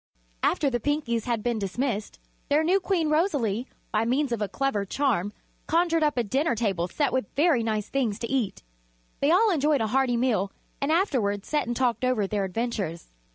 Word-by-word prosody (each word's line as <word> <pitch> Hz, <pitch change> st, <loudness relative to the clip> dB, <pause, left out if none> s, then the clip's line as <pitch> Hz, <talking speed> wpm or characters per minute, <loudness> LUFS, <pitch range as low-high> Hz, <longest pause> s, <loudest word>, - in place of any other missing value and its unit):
After 295 Hz, -, +2 dB
the 240 Hz, -, 0 dB
Pinkies 235 Hz, -4 st, -1 dB
had 235 Hz, -3 st, -1 dB
been 240 Hz, -2 st, 0 dB
dismissed, 215 Hz, +2 st, -2 dB, 0.3 s
their 295 Hz, +2 st, +3 dB
new 365 Hz, +5 st, +3 dB
Queen 350 Hz, -5 st, 0 dB
Rosalie, 270 Hz, -, +1 dB, 0.2 s
by 215 Hz, +1 st, +2 dB
means 255 Hz, +4 st, 0 dB
of 235 Hz, -2 st, -1 dB
a 210 Hz, -, 0 dB
clever 275 Hz, -7 st, -1 dB
charm, 205 Hz, -3 st, 0 dB, 0.4 s
conjured 330 Hz, 0 st, +2 dB
up 300 Hz, -3 st, +1 dB
a 240 Hz, -, +2 dB
dinner 270 Hz, +6 st, 0 dB
table 195 Hz, -6 st, 0 dB
set 280 Hz, -, -1 dB
with 260 Hz, -5 st, 0 dB
very 295 Hz, -4 st, +3 dB
nice 215 Hz, -2 st, -1 dB
things 240 Hz, -7 st, -1 dB
to 230 Hz, 0 st, -4 dB
eat. 250 Hz, -, -1 dB, 0.6 s
They 280 Hz, -, +2 dB
all 405 Hz, +6 st, +5 dB
enjoyed 300 Hz, -3 st, +2 dB
a -, -, +2 dB
hearty 245 Hz, +2 st, +1 dB
meal 215 Hz, -6 st, +1 dB, 0.3 s
and 280 Hz, +2 st, +1 dB
afterward 245 Hz, -, +1 dB
sat 300 Hz, -5 st, -1 dB
and 240 Hz, -, -2 dB
talked 250 Hz, -1 st, 0 dB
over 255 Hz, -5 st, +2 dB
their 200 Hz, 0 st, -1 dB
adventures. 190 Hz, -5 st, -3 dB
245 Hz, 190 wpm, -26 LUFS, 215-290 Hz, 0.6 s, all